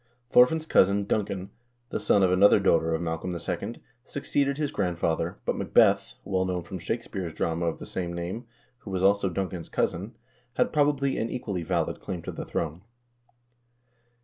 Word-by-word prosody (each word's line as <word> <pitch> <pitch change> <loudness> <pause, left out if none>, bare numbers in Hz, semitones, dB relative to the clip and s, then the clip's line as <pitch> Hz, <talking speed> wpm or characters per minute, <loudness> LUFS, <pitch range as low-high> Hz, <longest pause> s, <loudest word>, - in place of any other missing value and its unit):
Thorfinn's 155 +6 +5
cousin,3 100 -7 +3
Duncan, 100 -3 -2 0.4
the - - -1
son 100 - +3
of 90 - +4
another 100 +3 +6
daughter 80 -4 +3
of 80 - -3
Mal 80 -1 -2
colm 90 0 -4 0.4
II., - - -20 0.2
succeeded 140 0 -1
his 150 -2 -1
grandfather, 85 -3 -1
but - - 0
Macbeth, - - +3
well 95 -1 +1
known 90 -2 -2
from 95 +2 -7
Shakespeare's 95 -3 -4
drama 85 +1 -1
of 85 - -1
the - - -8
same 90 -2 -4
name, 90 +8 -5 0.3
who - - -10
was 95 -1 -1
also 100 0 +4
Duncan's 90 -1 -4
cousin, - - -1 0.4
had, - - +1
probably, 145 -2 +2
an 115 - -1
equally 100 -8 -3
valid 85 -1 -1
claim 90 -3 -5
to - - -5
the - - -6
throne. 80 +1 -3
95 Hz, 170 wpm, -27 LUFS, 85-105 Hz, 0.4 s, another